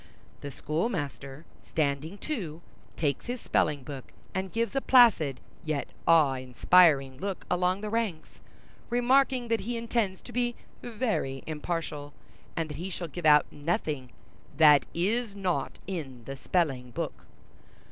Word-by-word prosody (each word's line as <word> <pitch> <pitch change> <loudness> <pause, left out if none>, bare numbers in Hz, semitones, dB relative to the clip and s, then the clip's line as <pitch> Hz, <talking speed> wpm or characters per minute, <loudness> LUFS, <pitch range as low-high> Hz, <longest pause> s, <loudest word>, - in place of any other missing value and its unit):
The 145 - -6
schoolmaster, 145 - -3 0.2
standing 155 +4 -2
too, 175 - -5 0.3
takes 145 - -1
his 245 +1 -3
spelling 145 -9 0
book, 135 -1 -8 0.2
and 190 0 -3
gives 230 +3 -1
a 270 - +2
placid 220 - +5 0.2
yet 155 -3 -2 0.2
awe 160 -5 +6
inspiring 135 +1 +4
look 195 +1 -4
along 180 +2 +1
the 215 - -3
ranks, 220 -8 -3 0.5
remarking 250 +1 +3
that 230 -1 +2
he 240 +1 -3
intends 230 -5 -1
to - - -11
be 240 0 0 0.3
very 215 - -2
impartial, 150 -2 -4 0.4
and 165 -1 0
that 145 - -6
he 180 +4 -4
shall 175 -2 -5
give 170 0 -2
out 150 0 +7
nothing 145 -4 -2 0.5
that 150 -2 +7
is 210 +5 0
not 190 -3 -2
in 145 -10 -6
the 135 +4 -6
spelling 135 -4 0
book. 120 - -5
165 Hz, 135 wpm, -28 LUFS, 145-215 Hz, 0.5 s, out